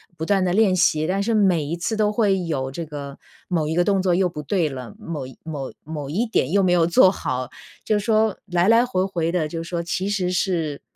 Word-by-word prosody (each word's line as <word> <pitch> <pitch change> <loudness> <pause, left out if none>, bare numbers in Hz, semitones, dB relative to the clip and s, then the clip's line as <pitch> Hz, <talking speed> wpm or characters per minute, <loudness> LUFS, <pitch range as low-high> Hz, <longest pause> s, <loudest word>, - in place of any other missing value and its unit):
不 160 - -6
断 190 +1 +2
地 180 - 0
练 205 -3 +4
习， 155 -3 +2
但 195 +2 0
是 230 +1 0
每 190 -7 +3
一 155 +4 -3
次 195 +6 -3
都 210 -1 +2
会 205 -3 +2
有 135 -5 -2
这 165 +4 -5
个 140 -2 -8 0.3
某 160 -4 0
一 160 - -1
个 175 +1 +3
动 195 0 +2
作 180 -2 +2
又 180 0 +2
不 150 -2 -7
对 170 -1 0
了， 125 -5 -8
某 155 -5 -5 0.2
某 145 -5 -5
某 150 -2 -6
一 225 +8 0
点 155 - 0
又 200 0 +3
没 185 -2 +2
有 170 -2 +4
做 175 +2 +6
好。 130 -9 -3 0.3
就 215 - +1
说， 215 0 +1
来 180 +1 +1
来 230 +2 +5
回 185 -7 0
回 170 -4 -1
的 170 -4 0
就 165 +1 -5
说 170 0 -3
其 175 +4 -2
实 185 -3 0
是 165 -5 -1
175 Hz, 250 characters per minute, -22 LUFS, 155-195 Hz, 0.3 s, 做